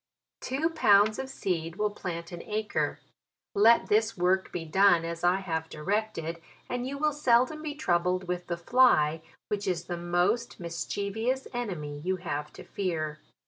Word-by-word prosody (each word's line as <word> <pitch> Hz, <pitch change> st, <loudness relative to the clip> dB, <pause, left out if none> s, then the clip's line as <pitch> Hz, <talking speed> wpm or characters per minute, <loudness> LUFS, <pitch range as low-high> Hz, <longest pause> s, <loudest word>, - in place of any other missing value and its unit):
Two 290 Hz, +6 st, -1 dB
pounds 210 Hz, -8 st, +4 dB
of 265 Hz, 0 st, -4 dB
seed 170 Hz, -8 st, -3 dB
will 210 Hz, +1 st, 0 dB
plant 170 Hz, -4 st, -6 dB
an 175 Hz, -1 st, -7 dB
acre. 215 Hz, 0 st, -1 dB, 0.6 s
Let 225 Hz, +3 st, +5 dB
this 220 Hz, +1 st, +2 dB
work 185 Hz, +2 st, +1 dB
be 165 Hz, -2 st, -4 dB
done 175 Hz, 0 st, +4 dB
as 170 Hz, 0 st, -5 dB
I 175 Hz, +1 st, +4 dB
have 160 Hz, -3 st, -3 dB
directed, 170 Hz, -1 st, -2 dB, 0.3 s
and 245 Hz, 0 st, -3 dB
you 280 Hz, +1 st, -4 dB
will 300 Hz, +1 st, +1 dB
seldom 265 Hz, +1 st, +2 dB
be 300 Hz, -2 st, -4 dB
troubled 180 Hz, -, +1 dB
with 180 Hz, 0 st, -3 dB
the 170 Hz, -, -2 dB
fly, 170 Hz, -7 st, +4 dB, 0.3 s
which 205 Hz, -1 st, -2 dB
is 175 Hz, -2 st, 0 dB
the 175 Hz, -1 st, -4 dB
most 175 Hz, +8 st, 0 dB
mischievous 200 Hz, +9 st, -2 dB
enemy 170 Hz, -12 st, -4 dB
you 185 Hz, +5 st, -1 dB
have 150 Hz, -5 st, -4 dB
to -, -, -10 dB
fear. 155 Hz, -6 st, -3 dB
190 Hz, 160 wpm, -28 LUFS, 170-225 Hz, 0.6 s, Let